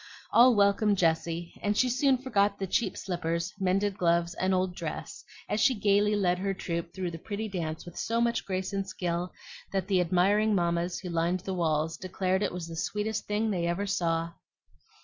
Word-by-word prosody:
All 245 0 +7
welcomed 200 0 +3
Jessie, 170 0 0
and 205 0 0
she 255 - +4
soon 260 +2 +3
forgot 205 -6 +1
the 195 - -2
cheap 195 +1 0
slippers, 170 0 -2
mended 195 +1 0
gloves, 170 0 +2
and 185 +2 0
old 185 -1 +1
dress, - - -6 0.2
as 210 - -1
she 265 -2 +4
gayly 205 0 +3
led 180 -3 +1
her 195 0 -1
troop 170 -2 -4
through 180 -1 -4
the 165 - -7
pretty 215 +4 -4
dance 165 -5 -4
with 175 - -10
so 230 +1 -1
much 235 0 +1
grace 190 0 -3
and 195 -1 -2
skill 175 -1 -2 0.4
that 195 -2 -1
the 190 -3 +3
admiring 200 +5 +3
mammas 170 0 0
who 185 - -6
lined 170 +2 0
the 190 0 -4
walls 160 -2 0
declared 185 0 -1
it - - 0
was 180 -1 -5
the 165 - -7
sweetest 210 +5 -2
thing 215 +1 0
they 175 -3 0
ever 175 +4 -1
saw. 165 -4 0
185 Hz, 190 wpm, -29 LUFS, 170-205 Hz, 0.4 s, All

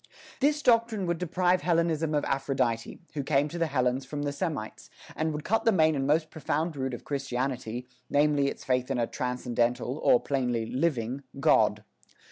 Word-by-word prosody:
This 295 +1 +2
doctrine 230 -4 +3
would 170 -1 -1
deprive 180 +1 +1
Hellenism 165 -2 +1
of 145 - +1
Aphrodite, 135 -3 -1
who 150 - -2
came 140 +1 +2
to 170 - -6
the 165 - +2
Hellenes 130 -2 0
from 145 -1 -5
the 145 - -1
Semites, 145 - -4 0.3
and 160 0 0
would 150 0 -4
cut 225 +3 +1
the 225 - +4
main 160 -5 +4
and 135 -1 -1
most 155 +2 +2
profound 155 +1 -2
root 130 -2 -2
of - - -11
Christianity, 125 -3 -3 0.2
namely 145 -1 +3
its - - -5
faith 125 0 0
in 135 - 0
a 120 - +2
"transcendental," 125 +2 -1
or, - - +5
plainly, 125 -5 -1
living 130 0 -1 0.2
God. 105 -5 +3
140 Hz, 175 wpm, -28 LUFS, 125-165 Hz, 0.3 s, or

